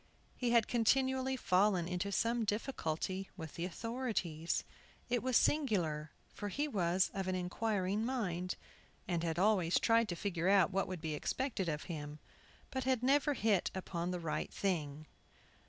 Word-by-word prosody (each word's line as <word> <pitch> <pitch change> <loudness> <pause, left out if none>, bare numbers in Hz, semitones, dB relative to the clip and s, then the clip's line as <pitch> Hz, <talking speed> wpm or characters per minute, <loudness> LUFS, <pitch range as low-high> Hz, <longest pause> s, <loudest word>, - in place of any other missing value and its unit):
He 245 - -1
had 235 -2 +4
continually 260 +2 +2
fallen 185 -4 +3
into 180 +2 -2
some 230 +3 +1
difficulty 195 - -2
with 160 -4 -7
the 170 - -3
authorities. 190 -6 -2 0.5
It 245 -1 +1
was 255 -1 +3
singular, 175 - +1 0.2
for 205 - -4
he 290 +9 -1
was 185 - +1
of 195 -1 -3
an 185 - 0
inquiring 195 +2 -1
mind, 185 -8 -1 0.5
and 170 -2 0
had 165 -1 -1
always 185 -3 +3
tried 230 -1 +3
to 175 - -2
find 180 -1 -3
out 190 +1 +4
what 195 +1 0
would 185 -3 -5
be 160 -1 -2
expected 200 - -1
of 150 -1 -2
him, 150 -3 -6 0.5
but 260 -1 -2
had 255 -2 +1
never 285 +2 +3
hit 215 -6 +2
upon 175 -2 -3
the 180 -1 -2
right 165 -2 -2
thing. 155 -6 -2
195 Hz, 155 wpm, -35 LUFS, 170-230 Hz, 0.5 s, had